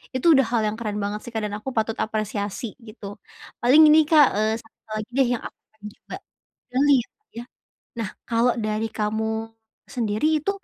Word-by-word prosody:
Itu 325 +6 +4
udah 270 -1 +4
hal 230 -1 0
yang 210 +1 -3
keren 210 -2 -3
banget 205 +1 -4
sih, 240 - -7
Kak, 220 - -1
dan 210 - -4
aku 260 +5 -6
patut 220 0 -1
apresiasi 215 0 -3
gitu. 215 -3 -10 0.5
Paling 275 +6 +7
ini, 310 0 +6
Kak, 300 -3 +6
eee, 215 +1 +1
satu 225 - -26 0.2
lagi 215 0 -6
deh 265 0 +3
yang - - -13
aku - - -9
akan 220 -1 -40 0.2
coba - - -9 0.6
pilih 275 +2 +4
ya, - - -19
Kak, 430 - -53
ya. 235 - -6 0.6
Nah 210 -4 -3 0.2
kalau 235 +1 +2
dari 215 0 -2
kamu 220 +1 -2 0.4
sendiri 250 +6 0
itu 395 - 0
225 Hz, 190 wpm, -23 LUFS, 215-255 Hz, 0.6 s, Paling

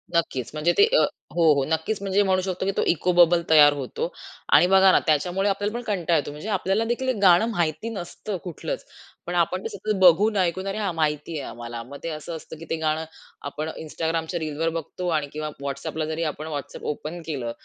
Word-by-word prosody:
नक्कीच 130 -7 0
म्हणजे 155 +3 +2
ते 415 - +8
अ - - +5 0.3
हो, 165 -3 +5
हो 140 - +1
नक्कीच 160 +6 -1
म्हणजे 200 +1 +2
म्हणू 190 -1 +2
शकतो, 185 0 -3
की 195 - +1
तो - - +3
इको 175 +2 +2
बबल 175 0 +5
तयार 150 -2 +7
होतो. 300 - -4 0.4
आणि 175 - +7
बघा 190 0 +6
ना, - - +5
त्याच्यामुळे 180 +6 +2
आपल्याला 205 +2 -1
पण 245 - -4
कंटाळा 180 -7 +1
येतो. 145 - -2
म्हणजे 150 +9 -7
आपल्याला 195 +1 +1
देखील 240 +3 -1
एक 255 - +1
गाणं 185 +2 +6
माहिती 170 +2 -1
नसतं 200 -1 -5
कुठलंच, 190 - -5 0.4
पण - - -4
आपण - - +1
ते 450 - -3
सतत 215 - -3
बघून, 200 +4 +6
ऐकून, 185 +1 0
"अरे 195 - -3
हां, 200 -5 -1
माहिती 155 0 -1
आहे 135 - -6
आम्हाला," 120 0 -7
मग 140 +4 -10
ते 165 - -3
असं 155 +2 -6
असतं, 160 0 -9
की 165 - -10
ते - - 0
गाणं 155 0 0 0.4
आपण 155 +2 -4
Instagramच्या 160 +2 -2
रीलवर 155 +1 -1
बघतो 175 +3 -5
आणि 145 - -3
किंवा 155 0 -4
WhatsAppला 140 +3 -3
जरी 160 +1 -2
आपण 155 +3 -8
WhatsApp 145 -1 -6
ओपन 165 +4 -7
केलं, 130 -7 -3
170 Hz, 210 wpm, -24 LUFS, 155-195 Hz, 0.4 s, ते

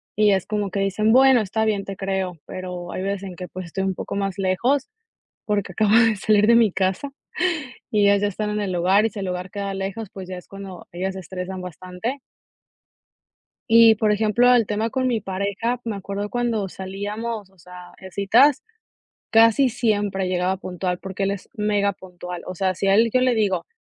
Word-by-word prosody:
Y 210 -1 +4
es 190 -2 +1
como 205 -2 -2
que 200 - -2
dicen: 200 +3 +1
''Bueno, 260 -1 +6
está 220 +2 -1
bien, 210 -2 0
te 195 - -6
creo''. 190 -3 -2
Pero 180 -1 -6
hay 185 - -4
veces 200 0 -2
en 185 -2 -7
que, 180 0 -7
pues, 185 -2 -7
estoy 190 +3 -3
un 190 -1 0
poco - - -5
más 195 -1 -2
lejos 240 +9 +1 0.6
porque 205 -3 -1
acabo 215 +3 +2
de 225 -1 +5
salir 210 +1 +3
de 235 - +6
mi 230 -4 +5
casa 190 +9 -1 0.8
y 210 - +2
ellas 200 0 +4
ya 205 - +2
están 210 +1 -3
en 210 - -1
el 195 - -2
lugar. 190 +5 +3
Y 225 - 0
si 205 - -7
el 195 - -3
lugar 180 0 -4
queda 200 -1 -4
lejos, 195 +2 -4
pues 190 -2 -8
ya 185 - -5
es 180 - -12
cuando 195 -2 -9
ellas 185 +2 -3
se 190 - -6
estresan 185 +1 -6
bastante. 180 - -5 1.5
Y, 225 0 +7
por 215 0 +1
ejemplo, 220 +4 +4
el 235 -3 +4
tema 215 +2 -1
con 260 +1 0
mi 235 -3 0
pareja, 200 +5 -2
me 225 - -2
acuerdo 200 +1 -4
cuando 235 -5 -1
salíamos, 205 +3 -5
o 190 - -28
sea, 180 +1 -13
en 190 -1 -11
citas, 235 +9 +4 0.7
casi 230 +4 +5
siempre 205 -5 0
llegaba 185 +1 0
puntual, 180 -1 -3
porque 195 0 -4
él 195 - 0
es 200 - -7
megapuntual. 200 -4 -2
O 185 - -5
sea, 185 +1 0
si 195 - -2
a 195 - +4
él 230 +2 +4
yo 255 - +3
le 255 -1 +3
digo: 195 -5 0
200 Hz, 205 wpm, -23 LUFS, 185-220 Hz, 1.5 s, Y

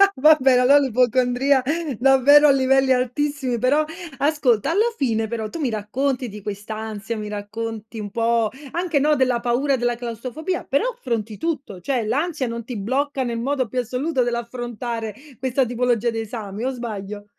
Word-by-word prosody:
vabbè, 270 -2 +5
allo 270 +3 +6
l'ipocondria 255 +1 +2 0.4
davvero 270 +3 +6
a 280 - +7
livelli 270 0 +3
altissimi, 255 0 -1
però 280 +5 +3 0.4
ascolta, 280 -4 +2
alla 440 +7 +2
fine 225 -4 0
però 220 -1 -4
tu 335 - -7
mi 275 - 0
racconti 250 +4 -2
di 210 0 -9
questa 205 +2 -6
ansia, 220 +1 -5
mi 210 - -5
racconti 220 +2 -6
un 205 -1 -5
po' 230 0 +1 0.2
anche, 345 -3 0
no, 300 +2 +3
della 255 -2 +2
paura 250 +4 +1
della 240 -1 0
claustrofobia, 255 - -4
però 280 - 0
affronti 235 - -3
tutto, 275 - -4
cioè 245 +1 -1
l'ansia 290 +3 -1
non 235 0 -5
ti 235 0 -6
blocca 265 +6 -1
nel 235 -1 -3
modo 260 0 -1
più 250 - -3
assoluto 255 +3 -1
dell'affrontare 235 -2 -4 0.2
questa 260 0 +1
tipologia 240 -1 +1
di 225 - -3
esami 215 -1 -6
o 260 - +1
sbaglio? 210 -5 -6
245 Hz, 160 wpm, -22 LUFS, 225-275 Hz, 0.4 s, a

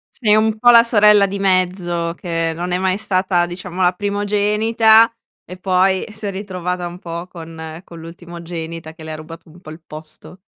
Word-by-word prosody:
Sei 215 -4 +3
un 215 0 +1
po' 245 - +5
la 235 0 +8
sorella 210 -3 +5
di 200 0 -4
mezzo, 180 -3 0
che 165 -2 -2
non 175 +2 -4
è 180 - +2
mai 185 0 0
stata 185 -3 0
diciamo 180 +1 -7
la 180 0 +3
primogenita 210 +3 +3 0.4
e 180 - -10
poi 185 0 +1
si 215 0 -9
è - - -2
ritrovata 180 -2 -4
un 175 +1 -8
po' 170 0 -7
con 160 -1 -9
con 170 -1 -12
l'ultimogenita 165 -1 -8
che 160 -1 -13
le 160 - -6
ha - - -5
rubato 160 +1 -11
un 175 +3 -17
po' 155 - -12
il 160 +1 -11
posto. 155 +4 -12
180 Hz, 190 wpm, -18 LUFS, 170-200 Hz, 0.4 s, la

